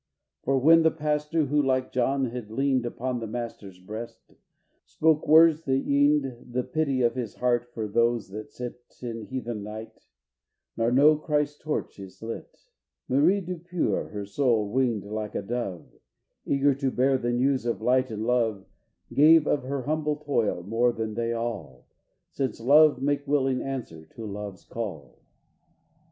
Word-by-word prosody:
For 135 +1 +1
when 165 +5 +6
the 160 - +5
pastor, 150 0 -1
who, 145 +2 +2
like 130 -2 0
John, 130 0 0
had 120 -3 -6
leaned 130 +1 0
Upon 125 +1 -3
the 115 - -5
Master's 110 -4 -6
breast, 110 +5 -9 0.5
spoke 155 -1 +1
words 160 0 +6
that 135 -1 +2
yeaned 140 -3 +1
The 125 0 0
pity 140 -4 0
of 120 - +3
his 120 -5 -5
heart 120 -1 0
for 110 -3 -4
those 115 0 +1
that 105 +2 -8
sit 125 0 -7 0.2
In 115 -2 -5
heathen 120 -4 -4
night, 110 +2 -9 0.7
nor 115 +1 +1
know 145 +5 +6
Christ's 150 -1 -1
torch 155 -8 -4
is 95 -1 -11
lit; 115 0 -8 0.4
Marie 160 +10 +3
Depure, 175 -1 -2
her 105 -1 -5
soul 110 -2 +1
winged 120 -4 +1
like 105 0 -5
a - - -2
dove 100 -6 -4 0.6
Eager 140 0 +3
to 135 0 -1
bear 130 +1 +2
the 120 0 -1
news 130 0 +1
of 115 - -1
light 130 +3 +2
and 110 0 -4
love, 115 -5 0 0.5
Gave 155 +2 +6
of 145 - +1
her 135 0 -3
humble 150 +1 -1
toil 140 -11 -1
more 115 +5 +2
than 110 -2 -4
they 115 +1 -1
all, 115 - -5 0.5
Since 130 -5 -3
love 145 +2 +5
makes 145 0 0
willing 135 -2 +1
answer 115 -13 -6
to 115 - -7
Love's 100 -2 -7
call. 80 - -7
125 Hz, 160 wpm, -26 LUFS, 115-145 Hz, 0.7 s, when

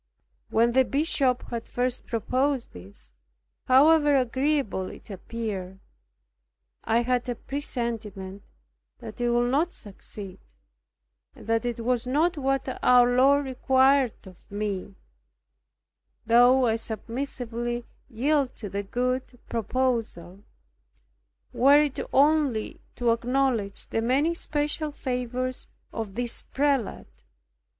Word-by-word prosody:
When 230 +2 +3
the 260 +2 +4
Bishop 270 -2 0
had 235 -1 -4
first 250 0 -2
proposed 255 +3 -1
this, 90 -10 -11 0.5
however 290 +2 +5
agreeable 260 -6 0
it - - -12
appeared, 195 -2 -5 1.1
I 230 +2 +2
had 250 0 0
a 245 - -1
presentiment 225 -8 -5 0.6
that 220 +2 -9
it 240 - +1
would 240 +1 +2
not 320 +6 +1
succeed, 200 -1 -10 1.0
and - - -14
that 225 +2 0
it 235 -1 -3
was 245 +1 0
not 310 +7 +2
what 270 -2 -1
our 245 0 +5
Lord 280 +3 +4
required 265 -1 +2
of 185 -2 -16
me, 200 -2 -4 1.3
though 245 +3 +5
I 225 -1 +2
submissively 240 +1 -4 0.2
yielded 270 +3 0
to 205 - -7
the 200 +2 -3
good 250 +4 -2
proposal, 225 -6 -2 1.1
were 280 +3 +6
it 295 -3 0
only 280 -5 +2
to 240 -1 +1
acknowledge 235 -3 0
the 225 - -2
many 275 +8 +2
special 300 -1 -2
favours 255 -2 -3 0.3
of 215 -4 -5
this 245 -1 -2
prelate. 275 -5 -2
245 Hz, 110 wpm, -26 LUFS, 225-270 Hz, 1.3 s, were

